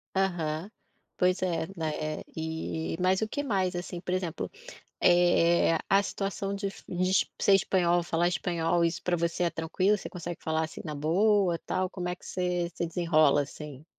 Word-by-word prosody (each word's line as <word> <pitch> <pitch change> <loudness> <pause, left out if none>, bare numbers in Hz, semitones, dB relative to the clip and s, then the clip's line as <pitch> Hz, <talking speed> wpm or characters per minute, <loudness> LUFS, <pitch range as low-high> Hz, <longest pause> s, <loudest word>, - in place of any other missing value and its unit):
Aham, 175 -2 -1 0.5
pois 180 +1 +2
é, 165 -3 0
né, 155 -2 -3
e 160 0 -3
mas 185 +2 +2
o 220 - 0
que 285 +6 -3
mais 190 -8 0
assim, 175 0 -5
por 180 0 -3
exemplo, 180 -3 -2 0.5
eh, 175 -1 +4
a 195 +1 +5
situação 195 0 -3
de 200 0 -2 0.2
de 185 +1 +1
ser 200 - +5
espanhol, 175 -2 +2
falar 170 +1 +1
espanhol, 170 -1 +1
isso 165 0 -1
pra 180 -1 0
você 170 +1 0
é 170 - +2
tranquilo? 185 +6 +1
Você - - -7
consegue 175 -1 -6
falar, 160 0 0
assim, 155 - -9
na 155 - -4
boa 180 +4 +3
tal, 185 0 -1
como 180 -2 -4
é 180 - -2
que - - -19
você 180 -1 -1
você 170 - -2
desenrola 160 -4 +3
assim? 145 0 -8
175 Hz, 170 wpm, -29 LUFS, 165-185 Hz, 0.5 s, a